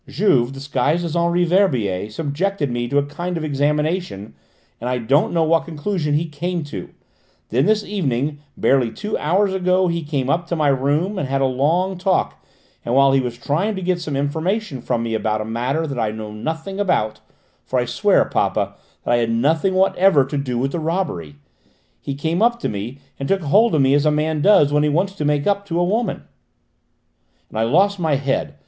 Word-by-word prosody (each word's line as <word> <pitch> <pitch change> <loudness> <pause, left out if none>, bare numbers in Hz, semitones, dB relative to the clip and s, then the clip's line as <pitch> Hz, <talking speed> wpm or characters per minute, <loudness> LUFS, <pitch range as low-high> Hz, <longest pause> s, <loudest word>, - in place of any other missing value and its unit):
"Juve, 135 - +2
disguised 140 +4 -1
as 165 0 -4
Henri 170 +1 +2
Verbier, 125 - +1
subjected 150 - -2
me 120 0 -2
to 140 - 0
a 145 - +3
kind 175 +5 -4
of 160 - -4
examination, 150 - -1 0.5
and 120 - -3
I 125 - 0
don't 135 +6 +2
know 165 -1 +2
what 165 +1 +2
conclusion 155 -1 -2
he 160 +3 +1
came 170 +2 -3
to. 105 -11 -7 0.6
Then, 130 +5 +2
this 215 -1 +2
evening, 145 -8 -2 0.2
barely 130 -4 +2
two 210 - -4
hours 190 +5 +1
ago, 185 0 +2
he 170 0 -1
came 145 -4 -2
up 170 +5 0
to 170 - -2
my 155 -3 +2
room 145 +9 0
and 140 - -2
had 135 0 0
a - - +3
long 165 +9 0
talk, 185 0 0 0.4
and 120 - -1
while 135 0 +5
he 135 - +3
was 125 -2 -3
trying 170 - -1
to 190 - -5
get 175 -1 0
some 150 -4 -4
information 160 - -2
from 120 -1 -1
me 115 -1 -3
about 110 -1 0
a 110 - -3
matter 125 +8 -1
that 135 -5 -4
I 110 -2 +1
know 110 0 -6
nothing 160 - -5
about 110 - 0 0.4
for - - -2
I - - +1
swear, - - +2
papa, - - 0 0.3
that - - -1
I - - +4
had 115 -1 0
nothing 155 +11 +1
whatever 185 -5 +4
to 135 - -5
do 125 -3 -3
with 135 +3 -1
the 170 - -2
robbery 155 - -3 0.7
he 140 - -4
came 160 +6 -1
up 235 +1 +3
to - - -1
me 105 +6 -5 0.2
and 135 - -4
took 195 -1 +2
hold 210 +8 +4
of 150 - +3
me 135 +1 +4
as 145 +1 +3
a - - +4
man 155 0 0
does 150 -6 +5
when 150 - +3
he 150 - +2
wants 180 +6 0
to 155 -6 -4
make 145 -1 +1
up 200 0 +1
to 170 -2 -1
a - - +3
woman. 210 +3 -1 1.3
And 110 - -5
I - - +3
lost 195 - +3
my 160 -4 +1
head! 135 0 -1
150 Hz, 210 wpm, -20 LUFS, 135-180 Hz, 1.3 s, while